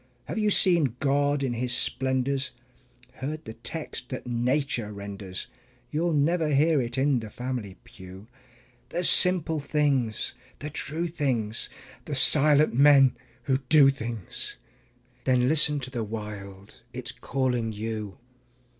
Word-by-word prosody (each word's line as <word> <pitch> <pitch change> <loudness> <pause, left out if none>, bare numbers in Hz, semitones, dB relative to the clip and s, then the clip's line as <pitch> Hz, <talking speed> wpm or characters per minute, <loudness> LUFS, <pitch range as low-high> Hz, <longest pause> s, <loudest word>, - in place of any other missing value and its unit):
Have - - -4
you 210 -1 +2
seen 170 - +3
God 145 0 +1
in 130 -3 -1
His 125 +1 +1
splendors, 130 +1 -1 0.7
heard 155 +4 -5
the 110 - -7
text 125 +2 -7
that 130 - -6
nature 120 -1 -1
renders? 100 -2 -7 0.5
(You'll 165 +2 0
never 160 +3 +1
hear 150 +1 +3
it 120 +1 -4
in 135 -1 +2
the 110 -1 -8
family 120 -4 -5
pew). 95 +1 -13 0.6
The 175 - -3
simple 170 -3 +5
things, 140 -6 0 0.2
the 150 +1 -7
true 155 +3 -3
things, 130 -10 -2 0.4
the - - -4
silent 150 +1 +5
men 135 0 +6 0.3
who 135 -2 +1
do 145 -3 +7
things 115 -7 -4 0.7
Then 125 -1 +3
listen 150 0 +3
to 130 0 -6
the 120 -3 -3
Wild 105 -2 -8
it's 125 -1 -5
calling 125 -4 -2
you. 110 -1 -5
130 Hz, 130 wpm, -26 LUFS, 115-150 Hz, 0.7 s, do